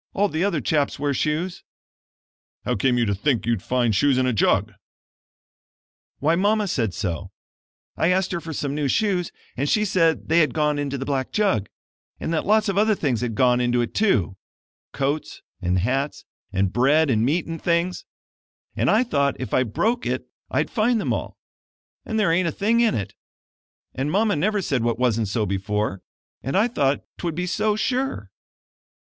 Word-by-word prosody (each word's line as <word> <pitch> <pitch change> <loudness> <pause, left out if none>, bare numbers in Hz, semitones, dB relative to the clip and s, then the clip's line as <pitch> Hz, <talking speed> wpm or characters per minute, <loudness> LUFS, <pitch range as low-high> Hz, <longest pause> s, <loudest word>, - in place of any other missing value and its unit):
All 205 +1 +2
the 160 +1 -1
other 170 -7 0
chaps 145 +3 0
wear 145 0 0
shoes." 155 +6 -2 1.0
"How - - 0
came 125 +4 +2
you 120 - +2
to 100 - 0
think 115 +4 0
you'd 115 -4 0
find 120 -3 +1
shoes 140 +5 +3
in 130 - +2
a 125 - +1
jug?" 105 0 +2 1.4
"Why 160 +4 +2
Mama 205 +3 +2
said 115 - -1
so. 90 -8 -3 0.7
I 165 - +1
asked 185 +1 +1
her 170 -2 -2
for 160 - -7
some 140 -2 -3
new 145 -1 -1
shoes 185 - 0 0.2
and 140 +3 -1
she 215 0 +2
said 165 -5 +1
they 165 +1 +4
had 155 -6 +2
gone 150 -1 +1
into 140 -1 -2
the 135 - -4
black 135 -2 -2
jug, 195 - +1 0.5
and 165 - -3
that 160 - -1
lots 215 +1 +3
of 195 0 +1
other 215 0 +3
things 130 - -1
had 120 -3 -2
gone 125 +1 +3
into 120 0 +1
it, 120 - -1
too 100 - +1 0.5
coats 140 -3 -3 0.2
and 90 +1 +1
hats, 130 +9 -1 0.3
and 95 -1 0
bread 140 +4 +3
and 110 -2 +2
meat 155 +7 +1
and 165 0 -6
things 175 +1 0 0.7
and - - +1
I 220 +4 +4
thought 140 - 0
if 130 - -5
I - - +4
broke 225 - 0
it - - -2 0.2
I'd - - -1
find 230 +1 +2
them - - -1
all, - - -5 0.7
and 220 -1 -1
there 200 -6 +3
ain't 170 +1 +2
a - - 0
thing 220 +8 +1
in 235 -2 +3
it 100 -4 -4 0.8
and 135 +3 -2
Mama 210 +1 +2
never 200 +6 0
said 135 -6 0
what 120 0 0
wasn't 115 -3 +1
so 105 +2 -1
before 100 0 -2 0.4
and 135 +8 -1
I 215 +4 +4
thought 140 - 0 0.2
'twould 170 -3 -3
be 180 +2 -2
so 210 +3 0
sure." 260 +5 -2
145 Hz, 190 wpm, -23 LUFS, 120-190 Hz, 1.4 s, they